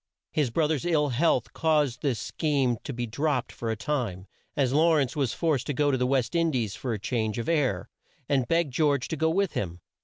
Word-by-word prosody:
His 150 -5 +1
broth 150 +6 +1
er's 155 -1 -1
ill 155 -4 +2
health 130 -1 +1
caused 150 -6 +1
this 135 -5 0
scheme 135 -4 0
to - - -3
be 120 -2 -3
dropped 135 +2 -1
for 115 - -5
a 110 - 0
time, 115 -7 -2 0.3
as 135 -3 +2
Law 160 +2 +4
rence 140 -1 +1
was 135 -6 0
forced 150 -6 0
to 145 - -2
go 145 +1 +2
to - - +2
the 125 0 +1
West 130 0 +1
In 165 -1 +2
dies 115 -9 -1
for 120 0 -3
change 110 +1 -2
of 115 - -3
air, 135 - +1 0.4
and 135 -4 +1
begged 165 -3 +1
George 145 -2 +2
to - - -1
go 160 +1 +1
with 195 +2 +1
him. 90 -3 -3
140 Hz, 220 wpm, -27 LUFS, 120-155 Hz, 0.4 s, Law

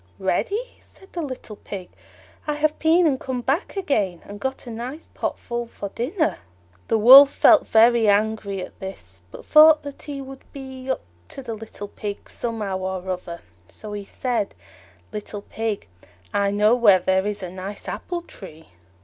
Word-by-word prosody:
"Ready!" 195 - 0 0.2
said 385 - -19
the 345 - -3
little 255 -7 -7
Pig, 190 -4 -7 0.6
"I 300 - 0
have 300 +1 0
been 330 +2 +4
and 275 -5 +2
come 255 -2 -3
back 290 - -1
again, 210 - 0
and 205 0 -9
got 265 +4 -4
a 240 - -7
nice 250 +8 -7
pot - - -3
full 240 0 -4
for 205 -3 -7
dinner." 310 - -1 0.5
The 225 - +2
Wolf 270 +6 +10
felt 320 - +5
very 230 0 +5
angry 205 -2 +1
at - - -19
this, 190 0 -9
but - - -11
thought 310 0 +7
that 285 -1 -8
he 285 -2 -6
would 270 0 -9
be 265 -1 -8
up 260 - 0 0.3
to 275 - -8
the 235 -2 -5
little 220 -2 -8
Pig 205 0 -7
somehow 215 -5 -3
or 190 0 -4
other; 175 -2 -6 0.3
so 215 - -9
he 205 -1 -5
said, 230 0 -2 0.6
"Little 210 -1 -6
Pig, 220 -2 -4 0.5
I 200 0 +2
know 210 +2 +3
where 225 -6 +6
there 190 +2 +1
is 205 -2 -3
a 180 - -5
nice 190 +2 -7
apple 350 -1 -4
tree." 160 - -13
225 Hz, 175 wpm, -23 LUFS, 200-275 Hz, 0.6 s, Wolf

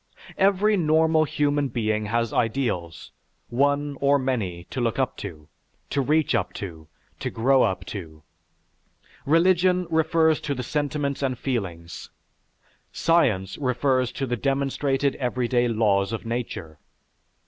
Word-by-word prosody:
Every 200 +2 +3
normal 160 -1 +3
human 145 -1 0
being 110 -4 -1
has 115 +1 -1
ideals, 110 - -2 0.4
one 145 +2 0
or 140 0 +4
many, 110 -10 -2
to 130 - -3
look 115 -2 0
up 130 -2 0
to, 80 -7 -8 0.4
to 140 - +1
reach 150 +2 +2
up 105 -5 0
to, 80 -6 -8 0.3
to - - -2
grow 130 +3 +3
up 95 -4 0
to. 80 -6 -8 1.0
Religion 180 +3 +3
refers 160 0 +3
to 140 - -2
the 125 - -4
sentiments 145 +1 -2
and 130 -2 -1
feelings; 90 -11 -4 0.8
science 120 - +1
refers 130 -1 +1
to 135 - -2
the 120 -1 -2
demonstrated 140 +1 0
everyday 125 -1 0
laws 105 -4 +1
of 115 - -5
nature. 110 -10 -5
130 Hz, 125 wpm, -24 LUFS, 110-145 Hz, 1.0 s, or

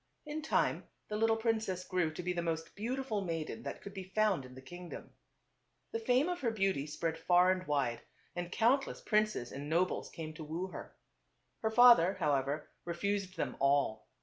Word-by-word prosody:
In 305 +1 -4
time 310 - +1 0.2
the 210 - -2
little 225 +1 +3
princess 220 -5 0
grew 180 -4 0
to 180 - -5
be 180 +1 -1
the 175 - -1
most 165 -1 -3
beautiful 230 0 -2
maiden 165 +3 -3
that - - -6
could 200 - -8
be 190 -1 -5
found 210 -10 +2
in 125 0 -12
the 130 - -10
king 175 +5 -9
dom. - - -9 0.8
The 455 - -2
fame 280 - +3
of 355 -1 -2
her 240 - +2
beauty 195 -9 0
spread 160 +2 -2
far 180 +2 +5
and 185 0 -2
wide, 135 -5 0 0.3
and 175 0 -4
countless 250 +7 +2
princes 215 - +1
and 145 +2 -6
nobles 175 +3 +1
came 155 -2 -7
to 155 - -8
woo 165 +5 -4
her. - - -9 0.7
Her 220 - +1
father, 220 -5 +7
however, 145 0 0 0.2
refused 190 +2 -2
them - - -2
all. 140 -6 +2
185 Hz, 185 wpm, -33 LUFS, 160-220 Hz, 0.8 s, father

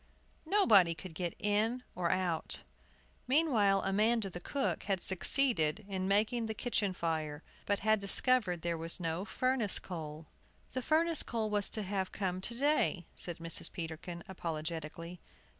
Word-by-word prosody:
Nobody 210 - +5
could 165 +2 -9
get 175 0 -3
in 220 +4 0
or 175 -1 -1
out! 175 -3 -1 0.6
Meanwhile, 240 -9 +3
Amanda, 210 +1 +2
the 175 - -6
cook, 275 +10 -2
had 195 -2 0
succeeded 190 - +2
in 190 -2 -2
making 220 +4 +2
the 220 - -4
kitchen 210 -4 0
fire, 160 -3 -3 0.2
but 205 -1 0
had 215 +1 +3
discovered 200 -3 +3
there 170 -1 -1
was 165 +2 -3
no 165 +2 -2
furnace 255 -3 +1
coal. 155 -3 -7 0.5
"The 255 - -2
furnace 320 +3 +3
coal 220 -2 -2
was 205 -1 +1
to 215 - -3
have 190 -1 -2
come 185 -2 -2
to 235 +5 -3
day," 275 - +1
said 175 -2 -3
Mrs. 165 -1 +1
Peterkin, 170 0 -6
apologetically. 165 -1 -5
195 Hz, 145 wpm, -33 LUFS, 170-220 Hz, 0.6 s, Nobody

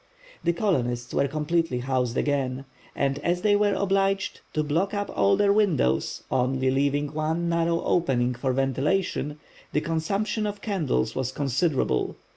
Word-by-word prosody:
The 170 - +3
colonists 125 - -1
were 140 - +2
completely 155 0 0
housed 125 -2 -1
again, 135 -2 -1 0.3
and 140 0 0
as 175 +3 -1
they 205 -1 +4
were 205 -1 +2
obliged 195 0 0
to 155 - +1
block 170 +8 0
up 205 0 -2
all 100 0 +4
their 200 -1 +4
windows, 165 - +1
only 130 +1 +1
leaving 145 +2 0
one 160 +3 -1
narrow 170 0 +1
opening 125 -7 +1
for 130 +2 -1
ventilation, 140 +4 0 0.4
the 150 - +2
consumption 195 +7 -1
of 205 0 -5
candles 160 - -1
was 130 -1 -1
considerable. 140 - 0
150 Hz, 145 wpm, -26 LUFS, 130-185 Hz, 0.4 s, they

